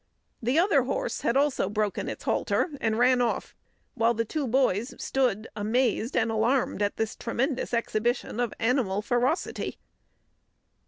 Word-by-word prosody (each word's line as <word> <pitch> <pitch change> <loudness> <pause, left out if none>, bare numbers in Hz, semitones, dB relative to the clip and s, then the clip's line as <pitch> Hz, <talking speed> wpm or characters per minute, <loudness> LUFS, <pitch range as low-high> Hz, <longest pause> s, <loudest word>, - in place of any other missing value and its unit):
The 245 +5 +1
other 375 +5 +4
horse - - -2
had 235 - +1
also 280 -8 +1
broken 210 -1 -1
its - - -7
halter 350 - 0
and 220 -1 +1
ran 250 +1 +4
off, 240 - -1 0.4
while 230 +1 +2
the 230 +1 0
two 290 +3 -2
boys 240 -2 +1
stood 245 -5 0
amazed 230 +3 0
and 225 -1 +2
alarmed 230 +2 +1
at 205 0 0
this 220 -1 -2
tremendous 255 +3 -2
exhibition 235 0 -1
of 240 -3 0
animal 225 -5 +1
ferocity. 245 - -1
235 Hz, 145 wpm, -27 LUFS, 220-260 Hz, 0.4 s, other